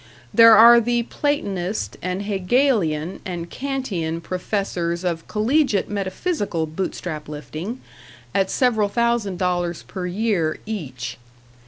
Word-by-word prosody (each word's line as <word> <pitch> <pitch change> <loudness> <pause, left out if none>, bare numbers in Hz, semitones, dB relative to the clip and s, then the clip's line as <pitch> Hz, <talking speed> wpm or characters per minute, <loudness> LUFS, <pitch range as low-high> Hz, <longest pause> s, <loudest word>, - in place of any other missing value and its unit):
There 230 -1 +8
are 235 +2 +9
the 240 +1 +1
Platonist 210 -9 -2
and 185 +2 -3
Hegelian 195 - +1
and 175 -2 -5
Kantian 210 -13 -3
professors 180 -1 -2
of 170 -2 -2
collegiate 220 -1 +1
metaphysical 200 - -2
Bootstrap 155 -1 -5
lifting 155 - -6 0.5
at 190 -1 +2
several 225 -6 +2
thousand 235 -4 0
dollars 175 -5 -1
per 180 +10 -5
year 180 -4 0
each. 130 - -5
190 Hz, 110 wpm, -22 LUFS, 170-230 Hz, 0.5 s, are